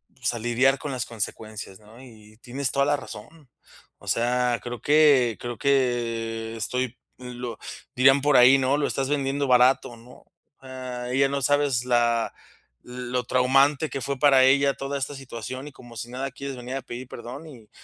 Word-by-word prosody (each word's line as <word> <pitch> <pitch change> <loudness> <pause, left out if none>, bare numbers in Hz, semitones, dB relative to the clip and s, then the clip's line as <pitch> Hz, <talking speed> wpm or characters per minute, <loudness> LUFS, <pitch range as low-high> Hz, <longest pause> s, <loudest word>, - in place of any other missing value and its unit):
pues, 125 -1 -2
a 120 - -5
lidiar 125 +4 +2
con 145 - -5
las 125 -2 -3
consecuencias, 110 -3 -6
¿no?, 110 +3 -16
y 110 -4 -16
tienes 130 +3 -4
toda 140 0 +2
la 145 0 +2
razón. 135 +4 -12 0.5
O - - -17
sea, 125 0 +1
creo 120 -2 -6
que 145 -6 +4
creo 120 -1 -6
que 115 -4 -1
estoy, 125 +2 -3 0.2
lo 125 -2 -7 0.4
dirían 135 +2 +5
por 145 0 +4
ahí, 125 +2 +7
¿no?: 135 +1 +1
"Lo 145 - 0
estás 135 -1 -2
vendiendo 140 -1 -1
barato", 125 -1 +3
¿no?, 120 +2 -17 0.4
ah, 130 -2 -7
ella 135 +1 +3
no 140 0 -2
sabes 140 -3 +1
la 120 -2 +1 0.5
lo 125 0 -4
traumante 135 +4 +3
que 135 - -4
fue 140 +1 -3
para 135 -1 +5
ella 140 +1 +4
toda 140 +1 -4
esta 140 +1 -3
situación, 130 0 -7
y 145 - -11
como 120 -3 -13
si 120 +3 -6
nada 135 +2 -4
quieres 140 +1 -7
venir 125 +1 -6
a 135 - -3
pedir 125 +1 -8
perdón. 125 +7 -9
Y 120 -8 -14
125 Hz, 180 wpm, -25 LUFS, 120-135 Hz, 0.5 s, ahí